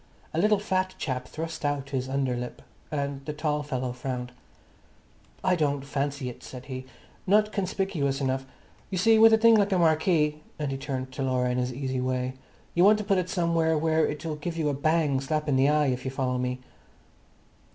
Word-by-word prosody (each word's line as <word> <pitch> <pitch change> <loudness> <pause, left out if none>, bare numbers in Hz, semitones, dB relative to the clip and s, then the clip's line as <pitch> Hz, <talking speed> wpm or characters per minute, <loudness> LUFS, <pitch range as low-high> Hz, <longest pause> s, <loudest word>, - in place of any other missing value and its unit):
A 160 - 0
little 210 +3 +4
fat 185 -2 -1
chap 130 -3 -3
thrust 160 +1 -6
out 145 -1 -1
his 130 -1 -2
under 135 -2 0
lip, 125 0 -6 0.3
and 140 -2 -3
the 150 - -3
tall 150 0 -1
fellow 130 -4 -3
frowned. 125 0 -4 1.1
"I 185 - +3
don't 145 -4 0
fancy 140 -1 -2
it," 125 - -7
said 125 0 -9
he. 130 -1 -6 0.4
"Not 210 +2 +4
conspicuous 185 -8 -1
enough. 135 -1 -1 0.4
You 190 - -2
see, 220 +4 +5
with 225 0 +8
a 220 - +6
thing 230 +1 +6
like 205 -2 +4
a 190 - +3
marquee," 155 -2 +2 0.2
and 150 -2 -2
he 135 - -2
turned 130 -2 -4
to 130 - -6
Laura 130 -1 +1
in 125 - 0
his 125 0 -1
easy 130 0 -2
way, 130 0 -1 0.4
"you 175 - +4
want 210 +2 +7
to 210 - -3
put 195 -2 +2
it 180 0 -3
somewhere 165 -3 +1
where 160 +1 +2
it'll 150 +1 -4
give 165 +3 -4
you 155 -2 +1
a - - 0
bang 145 -1 +1
slap 150 +2 -1
in 140 - +2
the 135 +2 +4
eye, 150 -1 +3
if 125 - -5
you 130 - -2
follow 130 -1 -1
me." 125 0 -2
145 Hz, 205 wpm, -27 LUFS, 130-170 Hz, 1.1 s, with